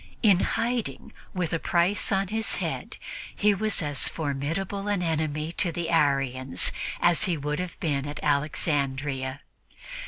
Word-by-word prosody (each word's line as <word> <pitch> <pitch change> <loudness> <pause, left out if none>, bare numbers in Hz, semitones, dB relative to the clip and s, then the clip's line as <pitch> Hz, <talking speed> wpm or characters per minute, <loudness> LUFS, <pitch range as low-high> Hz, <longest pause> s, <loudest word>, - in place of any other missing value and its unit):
In 200 -5 +6
hiding, 235 +2 -1 0.2
with 180 -3 -1
a 165 - +1
price 175 +7 +1
on 195 -1 +1
his 220 +1 0
head, - - -4 0.4
he 210 0 +4
was 210 -2 0
as 145 -1 +2
formidable 165 +7 -2
an 205 -3 +1
enemy 155 -1 -1
to 180 - +2
the 170 0 -3
Arians 135 -4 +3 0.3
as 175 -1 +4
he 175 -3 0
would 150 +2 -2
have 180 -1 -5
been 145 -3 -1
at 145 - -5
Alexandria. 140 -2 0
160 Hz, 145 wpm, -27 LUFS, 145-190 Hz, 0.4 s, In